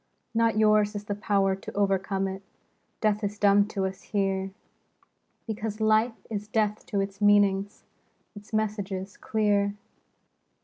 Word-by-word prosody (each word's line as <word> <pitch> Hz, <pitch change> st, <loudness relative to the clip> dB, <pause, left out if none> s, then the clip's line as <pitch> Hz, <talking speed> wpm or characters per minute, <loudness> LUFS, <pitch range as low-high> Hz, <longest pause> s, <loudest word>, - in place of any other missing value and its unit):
Not 230 Hz, -1 st, +2 dB
yours 215 Hz, -1 st, +4 dB
is 205 Hz, -, -4 dB
the 205 Hz, -, -3 dB
power 200 Hz, -2 st, +1 dB
to 195 Hz, -, -10 dB
o'ercome 195 Hz, 0 st, +1 dB
it: 190 Hz, 0 st, -5 dB, 0.6 s
Death 210 Hz, 0 st, +1 dB
is 205 Hz, +1 st, -2 dB
dumb 200 Hz, 0 st, +4 dB
to 195 Hz, -2 st, -2 dB
us 190 Hz, 0 st, -5 dB
here, 195 Hz, -2 st, -1 dB, 1.0 s
Because 215 Hz, -1 st, -4 dB
Life 220 Hz, +2 st, +2 dB
is 210 Hz, -1 st, -4 dB
deaf 215 Hz, -1 st, 0 dB
to 200 Hz, -2 st, 0 dB
its 195 Hz, +1 st, -5 dB
meanings, 205 Hz, -1 st, +3 dB, 0.5 s
Its 205 Hz, +1 st, -12 dB
messages 200 Hz, -3 st, -2 dB
clear. 205 Hz, -2 st, +1 dB
205 Hz, 135 wpm, -27 LUFS, 195-215 Hz, 1.0 s, yours